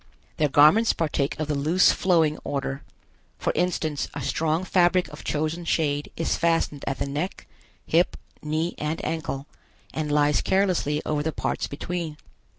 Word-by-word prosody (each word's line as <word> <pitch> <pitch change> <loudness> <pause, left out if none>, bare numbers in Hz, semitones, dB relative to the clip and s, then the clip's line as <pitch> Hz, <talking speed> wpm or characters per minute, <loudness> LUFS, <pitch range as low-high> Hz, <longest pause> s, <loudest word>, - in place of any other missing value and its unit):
Their 150 -1 +2
garments 155 +12 +6
partake 150 -3 -1
of 155 - -1
the 150 - 0
loose 155 +6 +4
flowing 165 -5 +2
order. 135 -1 -3 0.6
For - - -1
instance, 160 -5 0
a 145 - -4
strong 160 +5 0
fabric 180 0 +3
of 150 - -10
chosen 155 +3 -2
shade 145 -3 0
is 165 - 0
fastened 165 -4 +1
at 135 - -1
the - - -2
neck, 150 +7 -4 0.4
hip, 170 +3 +2 0.2
knee 155 +3 -1
and 150 +2 -2
ankle, 155 -4 -3 0.5
and 155 -1 -2
lies 145 0 +3
carelessly 185 -6 +1
over 150 -1 0
the 160 +2 -1
parts - - -2
between. 165 +1 -4
155 Hz, 155 wpm, -25 LUFS, 145-170 Hz, 0.6 s, garments